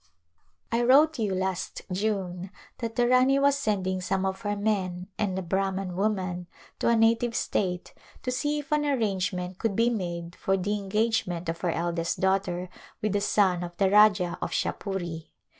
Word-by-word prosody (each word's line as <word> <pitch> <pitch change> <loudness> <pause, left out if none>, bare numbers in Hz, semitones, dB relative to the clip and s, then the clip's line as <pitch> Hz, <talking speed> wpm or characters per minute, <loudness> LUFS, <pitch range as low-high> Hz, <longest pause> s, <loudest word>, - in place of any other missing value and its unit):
I 230 +1 +2
wrote 280 +4 +5
you 205 -4 0
last 185 -1 -3
June 185 -2 -2 0.3
that 230 -2 -4
the 240 +1 +3
Rani 255 +2 +4
was 280 0 +4
sending 190 -8 -1
some 190 +1 -1
of 190 0 -2
her 205 0 -1
men 190 -3 -1
and 190 -3 0
a 190 - -2
Brahman 190 0 -1
woman 185 -3 -1 0.3
to - - +2
a 235 - +4
native 230 +1 +3
state 180 -2 -1 0.3
to 255 - -1
see 295 +4 0
if 290 -1 -7
an 300 0 +2
arrangement 190 -9 -1
could 225 -4 0
be 230 +3 +3
made 170 -5 -4
for 195 0 0
the 195 +3 -1
engagement 200 -4 -1
of 165 0 -4
her 180 - 0
eldest 170 0 -1
daughter 190 -2 0 0.3
with 215 -1 -1
the 205 - +1
son 190 -3 +2
of 175 0 -8
the 190 0 +2
Rajah 205 -4 +5
of - - -2
Shahpuri. 175 -5 -3
195 Hz, 175 wpm, -27 LUFS, 180-225 Hz, 0.3 s, wrote